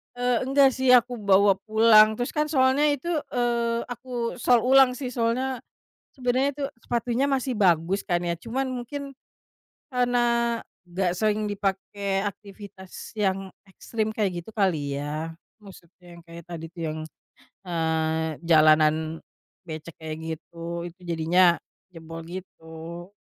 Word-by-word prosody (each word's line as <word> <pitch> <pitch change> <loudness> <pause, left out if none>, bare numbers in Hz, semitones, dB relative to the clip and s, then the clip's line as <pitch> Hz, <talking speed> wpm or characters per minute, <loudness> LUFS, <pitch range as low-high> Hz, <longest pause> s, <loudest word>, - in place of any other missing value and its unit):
Eee, 245 -1 +1
enggak 270 0 +5
sih 260 0 0
aku 245 0 +2
bawa 200 -1 +4
pulang, 220 0 +6
terus 245 +2 -3
kan 300 -1 0
soalnya 270 0 +3
itu, 290 +3 -1 0.2
eee, 235 -1 0
aku 245 -1 -4
sol 245 -1 +4
ulang 265 0 +5
sih 255 -1 -5
solnya, 250 +2 -1 0.5
sebenernya 255 +1 0
itu 285 +1 -5 0.2
sepatunya 240 +2 0
masih 265 -1 0
bagus 185 -1 +2
kan 175 -3 0
ya, 170 0 -1
cuman 245 +8 -3
mungkin, 275 +3 -6 0.7
karena 240 -2 +1 0.3
gak 180 0 -1
sering 215 -1 +1
dipakai 195 0 -2
aktivitas 200 -2 -9
yang 195 -2 -1 0.2
ekstrim 220 +3 -3
kayak 190 -5 -1
gitu 220 - -12
kali 155 -9 0
ya, 155 +3 -4 0.3
maksudnya 180 -3 -15
yang 170 - -13
kayak 170 0 -10
tadi 165 -2 -7
tuh 170 -1 -9
yang, 155 0 -4 0.7
eee, 160 -1 0 0.2
jalanan 155 -1 +6 0.7
becek 160 0 -8
kayak 155 -1 -6 0.2
gitu, 170 +1 -7
itu 175 +2 -12
jadinya 170 +1 +3 0.3
jebol 165 -1 -9
gitu. 170 -1 -9
200 Hz, 130 wpm, -25 LUFS, 170-245 Hz, 0.7 s, pulang